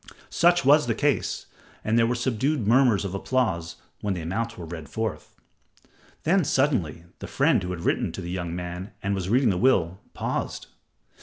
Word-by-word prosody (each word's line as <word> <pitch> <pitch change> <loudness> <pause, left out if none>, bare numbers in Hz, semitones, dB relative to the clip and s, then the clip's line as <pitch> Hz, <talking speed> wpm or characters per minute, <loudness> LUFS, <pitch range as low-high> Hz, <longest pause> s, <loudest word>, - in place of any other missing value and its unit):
Such 175 -3 +3
was 145 0 +5
the 115 - +1
case, 145 -1 0 0.4
and 110 - +1
there 115 0 +4
were 120 - 0
subdued 130 +1 0
murmurs 120 -4 +4
of 95 - -4
applause 95 -6 -1 0.2
when 100 -2 -2
the 85 - -4
amounts 115 +7 -3
were 85 - -7
read 80 -3 -8
forth. 110 +5 -4 0.9
Then 180 +3 +3
suddenly 120 - 0 0.2
the - - -7
friend - - +2
who 90 - -4
had 90 -2 -4
written - - 0
to - - -6
the 85 0 -5
young 85 -2 -3
man 90 +3 -6
and 100 0 0
was 95 -2 -3
reading 125 +1 +3
the 90 - -1
will, 95 -8 +2 0.2
paused. - - -3
105 Hz, 180 wpm, -25 LUFS, 90-130 Hz, 0.9 s, was